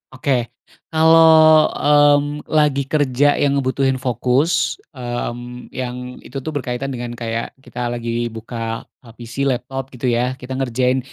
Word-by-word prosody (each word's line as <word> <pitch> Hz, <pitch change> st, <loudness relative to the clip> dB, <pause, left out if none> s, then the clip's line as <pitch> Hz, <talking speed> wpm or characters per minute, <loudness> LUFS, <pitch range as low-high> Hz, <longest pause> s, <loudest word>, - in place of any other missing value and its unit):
Oke 140 Hz, +2 st, -2 dB, 0.6 s
kalau, 160 Hz, -1 st, +6 dB
mmm, 145 Hz, 0 st, +3 dB
lagi 145 Hz, -2 st, +3 dB
kerja 145 Hz, -2 st, +2 dB, 0.2 s
yang 140 Hz, -, +3 dB
ngebutuhin 135 Hz, 0 st, 0 dB
fokus, 130 Hz, +6 st, +1 dB, 0.4 s
mmm, 120 Hz, 0 st, -5 dB
yang 125 Hz, -1 st, -3 dB, 0.3 s
itu 135 Hz, -, -8 dB
tuh 155 Hz, -, -2 dB
berkaitan 130 Hz, 0 st, -3 dB
dengan 120 Hz, -1 st, -5 dB
kayak 115 Hz, 0 st, -2 dB, 0.2 s
kita 125 Hz, -, -9 dB
lagi 120 Hz, -1 st, -4 dB, 0.3 s
buka, 115 Hz, +2 st, -7 dB, 0.5 s
eee, 115 Hz, -, -14 dB
PC, 120 Hz, 0 st, -10 dB
laptop 130 Hz, +2 st, -3 dB
gitu 125 Hz, +1 st, -6 dB
ya, 120 Hz, -, +1 dB, 0.2 s
kita 130 Hz, +1 st, -6 dB
ngerjain 130 Hz, 0 st, +1 dB
130 Hz, 135 wpm, -19 LUFS, 120-145 Hz, 0.6 s, kalau